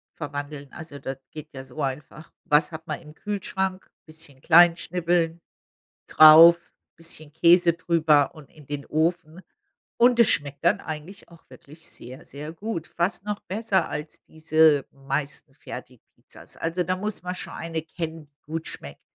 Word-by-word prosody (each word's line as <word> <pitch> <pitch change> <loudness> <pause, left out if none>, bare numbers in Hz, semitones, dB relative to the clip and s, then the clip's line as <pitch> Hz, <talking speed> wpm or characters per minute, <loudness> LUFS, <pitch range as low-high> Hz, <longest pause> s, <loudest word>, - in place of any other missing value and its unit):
verwandeln. 145 -2 -7
Also, 160 -4 -10
das 135 0 -6
geht 155 0 -10
ja 130 - -8
so 150 +3 -8
einfach: 140 +3 -6
was 150 +3 +2
hat 160 +1 -9
man 155 - -4
im 150 -2 -14
Kühlschrank? 190 0 -4 0.2
Bisschen 155 -4 -12
klein 170 +1 +6
schnibbeln, 170 -1 -1 0.7
drauf, 160 +2 +9 0.4
bisschen 160 -2 -7
Käse 170 +1 +5
drüber 160 -4 +2
und 150 -3 -14
in 150 -2 -18
den 140 0 -6
Ofen. 165 +1 -1 0.6
Und 240 0 +4
es 235 - +7
schmeckt 140 -1 +1
dann - - +3
eigentlich 160 +5 -8
auch 170 -1 -19
wirklich 155 +4 -14
sehr, 130 +5 -11
sehr 150 +3 -8
gut, 170 -2 -6
fast 175 +2 -2
noch 210 0 -4
besser 195 -3 -1
als 150 +1 -7
diese 155 -2 +2
meisten 140 +1 -5
Fertig-Pizzas. - - -12
Also, 165 +2 -2
da 185 +1 -2
muss 210 +2 -5
man 180 +1 -4
schon - - -7
eine 165 -1 -4
kennen, 160 -1 -7
die 140 0 -51
gut 160 +1 -5
schmeckt. 70 0 -8
160 Hz, 155 wpm, -24 LUFS, 150-175 Hz, 0.7 s, drauf